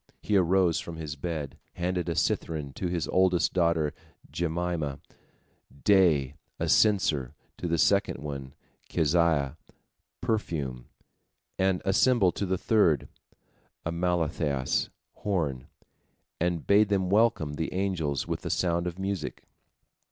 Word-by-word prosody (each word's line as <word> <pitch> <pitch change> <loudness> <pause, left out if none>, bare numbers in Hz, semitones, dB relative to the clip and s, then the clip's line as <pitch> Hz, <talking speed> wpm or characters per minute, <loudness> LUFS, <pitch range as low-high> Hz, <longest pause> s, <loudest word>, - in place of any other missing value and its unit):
He 105 - -1
arose 90 -2 +3
from 85 - -7
his 75 -2 -5
bed, 75 -1 -5
handed 90 0 -2
a 85 - -1
cithern 75 -4 -1
to 90 - -3
his 85 -2 -2
oldest 95 -2 +3
daughter 85 -4 +2 0.4
Jemimah, 85 -4 -2 0.8
"Day," 85 -10 +4 0.3
a - - -1
censer 80 - +3 0.2
to 90 - -3
the 85 0 +1
second - - +2
one, 70 -1 -7 0.3
Keziah, 80 -3 +2 0.6
"Perfume," 80 - -2 0.7
and 95 -1 +1
a 95 - +2
cymbal 110 -4 +4
to 100 - -3
the 95 +1 0
third, 90 - +2 0.8
Amaltheas, 80 -5 0 0.3
"Horn," 75 -11 -2 0.7
and 85 -1 -1
bade 105 +1 +4
them 95 -2 +1
welcome 105 -9 +3
the 80 +2 -3
angels 90 -7 -1
with - - -3
the - - -4
sound 85 -1 0
of 90 0 -5
music. 95 -4 -4
85 Hz, 120 wpm, -28 LUFS, 75-95 Hz, 0.8 s, Day